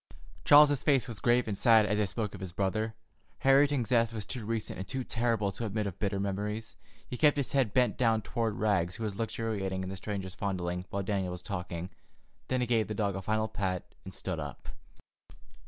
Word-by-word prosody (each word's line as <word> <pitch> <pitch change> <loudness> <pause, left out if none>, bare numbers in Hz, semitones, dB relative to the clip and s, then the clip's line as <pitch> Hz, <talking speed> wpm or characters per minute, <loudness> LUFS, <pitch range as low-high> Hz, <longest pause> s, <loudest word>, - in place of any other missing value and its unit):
Charles's 145 -1 +7
face 135 -5 +3
was 115 -5 -7
grave 120 0 +3
and 105 - -1
sad 110 0 +5
as 105 +1 0
they 105 - +2
spoke 105 +2 -3
of - - -8
his 95 -2 -5
brother. 110 +4 -1 0.5
Harrington's 135 -2 +4
death 115 -2 +3
was 110 -2 -4
too 125 -4 -5
recent 115 -4 -3
and 95 - -5
too 130 -1 -3
terrible 115 -4 0
to 115 - -6
admit 105 +1 -2
of 100 -3 -5
bitter 100 -1 -1
memories. 105 +3 -3 0.3
He 125 - -5
kept 150 0 +4
his 140 - -1
head 135 -6 +2
bent 125 +2 +2
down 115 -3 +3
toward 115 -4 -1
Rags, 95 -5 +1
who 115 - -6
was 105 -3 -3
luxuriating 105 -4 -2
in 95 - -4
the 95 - -5
stranger's 95 -2 -4
fondling, 90 -2 -3
while 100 0 -2
Daniel 95 -2 -1
was 90 0 -7
talking. 90 -2 -5 0.6
Then 130 -1 0
he - - +2
gave 115 -2 +1
the 110 - -4
dog 100 -2 0
a 95 - -3
final 110 +2 0
pat 95 -4 -3
and - - -8
stood - - -4
up. - - -7
110 Hz, 210 wpm, -30 LUFS, 95-115 Hz, 0.6 s, Charles's